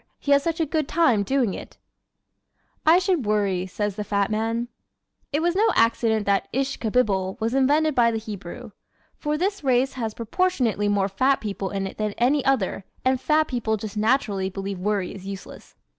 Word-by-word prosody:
He 285 Hz, -, -3 dB
has 280 Hz, 0 st, +6 dB
such 330 Hz, +2 st, -2 dB
a 325 Hz, -, +2 dB
good 310 Hz, -1 st, -1 dB
time 310 Hz, -11 st, +3 dB
doing 245 Hz, -2 st, +1 dB
it! -, -, -9 dB, 1.1 s
"I 325 Hz, +2 st, +8 dB
Should 360 Hz, -5 st, +1 dB
Worry," 200 Hz, -3 st, +1 dB
Says 205 Hz, +1 st, -3 dB
the 210 Hz, -, -2 dB
Fat 200 Hz, 0 st, 0 dB
Man 225 Hz, +2 st, 0 dB
¶ -, -, -20 dB, 0.6 s
It 300 Hz, +2 st, 0 dB
was 345 Hz, +1 st, +1 dB
no 430 Hz, +3 st, +4 dB
accident 225 Hz, -2 st, +2 dB
that 200 Hz, -1 st, +1 dB
"Ish 270 Hz, +1 st, -1 dB
ka 225 Hz, -, -2 dB
bibble" 195 Hz, -5 st, +1 dB
was 225 Hz, +2 st, -1 dB
invented 295 Hz, +4 st, +3 dB
by 240 Hz, -3 st, +4 dB
the 225 Hz, -, -1 dB
Hebrew. 215 Hz, +1 st, -8 dB, 0.5 s
For 300 Hz, 0 st, -1 dB
this 395 Hz, +2 st, -1 dB
race 260 Hz, 0 st, +2 dB
has 225 Hz, -4 st, -4 dB
proportionately 235 Hz, -, 0 dB
more 200 Hz, -1 st, +2 dB
fat 260 Hz, +8 st, +2 dB
people 200 Hz, -2 st, -4 dB
in 195 Hz, -1 st, -3 dB
it 195 Hz, -, -8 dB
than 210 Hz, -1 st, -1 dB
any 265 Hz, +4 st, +2 dB
other 230 Hz, -8 st, 0 dB, 0.2 s
and 260 Hz, 0 st, +2 dB
fat 310 Hz, 0 st, +2 dB
people 230 Hz, -3 st, -1 dB
just 215 Hz, 0 st, -7 dB
naturally 210 Hz, -4 st, +1 dB
believe 195 Hz, 0 st, -5 dB
worry 200 Hz, -1 st, -1 dB
is 195 Hz, -1 st, -10 dB
useless. 195 Hz, -1 st, -9 dB
225 Hz, 190 wpm, -24 LUFS, 200-275 Hz, 1.1 s, I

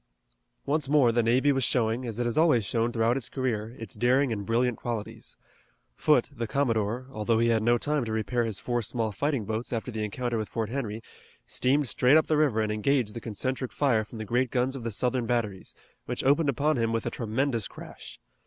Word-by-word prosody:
Once 145 Hz, -1 st, 0 dB
more 140 Hz, -5 st, +5 dB
the 120 Hz, +1 st, +2 dB
navy 125 Hz, +5 st, +3 dB
was 135 Hz, -1 st, +1 dB
showing, 115 Hz, +1 st, +1 dB
as 115 Hz, -2 st, -5 dB
it 120 Hz, -, 0 dB
has 120 Hz, -, -1 dB
always 155 Hz, -9 st, +4 dB
shown 115 Hz, +3 st, 0 dB
throughout 115 Hz, +1 st, +2 dB
its 135 Hz, -, -2 dB
career, 120 Hz, -3 st, -2 dB
its 115 Hz, -, -7 dB
daring 125 Hz, +1 st, +2 dB
and 100 Hz, -2 st, -5 dB
brilliant 120 Hz, +1 st, +1 dB
qualities. 115 Hz, -3 st, -6 dB, 0.6 s
Foote, -, -, +3 dB
the 115 Hz, 0 st, -3 dB
commodore, 115 Hz, -2 st, 0 dB
although 110 Hz, 0 st, 0 dB
he 115 Hz, +1 st, +3 dB
had 115 Hz, -, +4 dB
had -, -, -1 dB
no 120 Hz, +2 st, +3 dB
time 150 Hz, +2 st, 0 dB
to 110 Hz, -, -4 dB
repair 110 Hz, +2 st, 0 dB
his 110 Hz, -4 st, -2 dB
four 120 Hz, -1 st, -1 dB
small 115 Hz, 0 st, -1 dB
fighting 140 Hz, 0 st, -1 dB
boats 110 Hz, +3 st, -3 dB
after 120 Hz, +1 st, -3 dB
the 110 Hz, -2 st, -3 dB
encounter 120 Hz, +2 st, -2 dB
with 110 Hz, -, -4 dB
Fort 110 Hz, -2 st, -3 dB
Henry, 115 Hz, -4 st, -4 dB, 0.4 s
steamed 140 Hz, +2 st, +1 dB
straight 125 Hz, +7 st, +4 dB
up 160 Hz, -, +3 dB
the 155 Hz, -, +1 dB
river 145 Hz, -8 st, +2 dB
and 105 Hz, -1 st, -1 dB
engaged 110 Hz, +1 st, +1 dB
the 115 Hz, -, -6 dB
concentric 130 Hz, +4 st, -3 dB
fire 125 Hz, -7 st, +2 dB
from 110 Hz, +2 st, -11 dB
the 110 Hz, -, -5 dB
great 125 Hz, +4 st, +1 dB
guns 130 Hz, +2 st, 0 dB
of 130 Hz, -, -6 dB
the 115 Hz, -, -2 dB
Southern 125 Hz, +2 st, 0 dB
batteries, 110 Hz, -6 st, -2 dB, 0.3 s
which -, -, -3 dB
opened 145 Hz, +3 st, +3 dB
upon 145 Hz, +3 st, +1 dB
him 115 Hz, -1 st, +1 dB
with 115 Hz, -1 st, -1 dB
a -, -, -2 dB
tremendous 115 Hz, 0 st, -1 dB
crash. -, -, -11 dB
120 Hz, 220 wpm, -27 LUFS, 110-130 Hz, 0.6 s, more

